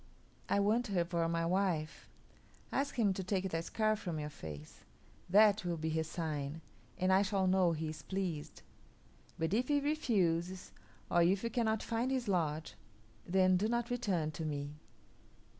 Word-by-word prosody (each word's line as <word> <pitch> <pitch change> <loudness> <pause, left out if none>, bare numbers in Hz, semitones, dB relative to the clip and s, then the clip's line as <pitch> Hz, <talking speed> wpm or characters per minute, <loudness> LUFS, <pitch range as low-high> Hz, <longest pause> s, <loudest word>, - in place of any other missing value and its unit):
I 200 - +3
want 220 +5 +2
her 180 -4 +1
for 170 -1 0
my 165 0 0
wife.' 175 -3 -1 0.6
Ask 280 +1 -1
him 215 -6 +3
to 190 - -4
take 190 0 -1
that 165 0 -2
scar 215 +2 +1
from 175 -6 -4
your 150 0 -4
face; 75 - -9 0.5
that 210 +2 +6
will 175 -2 -2
be 160 0 -2
his 160 0 -1
sign, 155 -2 -3 0.4
and 185 +1 +2
I 190 - +6
shall 195 -1 +1
know 185 -2 +3
he 155 0 -3
is 155 - -7
pleased. 185 -6 -4 0.7
But 165 +1 -1
if 245 +4 +2
he 290 -1 +3
refuses, 190 - 0 0.4
or 175 - +4
if 185 +4 +3
you 230 - -1
cannot 220 -3 0
find 230 +2 -1
his 260 -3 -1
lodge, 160 - 0 0.5
then 185 0 +4
do 205 +4 +1
not 235 +1 -1
return 190 -11 0
to 160 - -6
me." 145 -2 -3
185 Hz, 170 wpm, -34 LUFS, 165-215 Hz, 0.7 s, that